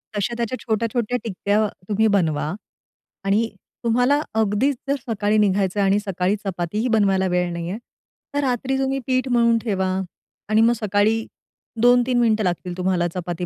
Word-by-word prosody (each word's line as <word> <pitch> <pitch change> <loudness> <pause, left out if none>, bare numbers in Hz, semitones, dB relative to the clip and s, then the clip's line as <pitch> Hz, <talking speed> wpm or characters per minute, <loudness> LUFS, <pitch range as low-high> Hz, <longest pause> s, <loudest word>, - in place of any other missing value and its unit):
तश्या 220 +4 -1
त्याच्या 235 +2 -2
छोट्या-छोट्या 230 +1 -1
टिक्या 210 0 0 0.2
तुम्ही 220 +1 +3
बनवा. 155 -4 0 0.7
आणि 215 +4 +2 0.3
तुम्हाला 245 +5 +3 0.2
अगदीच 220 +6 +2
जर 280 - +3
सकाळी 215 -1 +1
निघायचं 200 -1 +2
आणि 195 +1 +3
सकाळी 195 -1 -1
चपातीही 195 +5 -2
बनवायला 195 -4 +2
वेळ 180 -1 0
नाही 170 0 -4
आहे, 200 - -3 0.6
तर 285 - +1
रात्री 265 +1 0
तुम्ही 270 0 0
पीठ 255 0 +1
मळून 235 -1 +4
ठेवा 190 -5 -1 0.6
आणि 215 +1 +4
मग 235 +1 +5
सकाळी 215 +1 +1 0.6
2-3 245 0 +4
मिनिटं 220 -2 +2
लागतील 180 -1 -2
तुम्हाला 180 -1 +1
चपाती 175 -1 -4
215 Hz, 145 wpm, -22 LUFS, 190-235 Hz, 0.7 s, मग